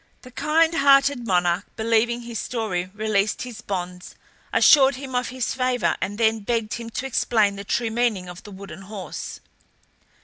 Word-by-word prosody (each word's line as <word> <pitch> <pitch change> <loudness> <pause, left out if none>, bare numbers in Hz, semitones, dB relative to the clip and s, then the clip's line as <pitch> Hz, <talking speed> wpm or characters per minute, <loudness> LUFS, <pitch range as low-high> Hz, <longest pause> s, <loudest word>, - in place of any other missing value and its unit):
The 255 - -12
kind 320 +5 +2
hearted 275 -4 +4
monarch, 180 0 +1
believing 230 +2 +1
his 235 -2 -5
story, 190 -7 -3
released 215 -1 0
his 245 -3 -8
bonds, 180 -2 -5 0.4
assured 275 -3 +6
him 265 0 -8
of 250 0 0
his 255 -1 -2
favour, 255 -1 0
and 200 +2 -3
then 225 -1 +2
begged 225 +1 -2
him 235 -1 -5
to 240 +3 -4
explain 220 -5 +1
the 200 - -7
true 230 +3 -1
meaning 220 -6 0
of 180 0 -9
the - - -12
wooden 195 0 -10
horse. 195 -1 -7
225 Hz, 165 wpm, -23 LUFS, 200-250 Hz, 0.4 s, assured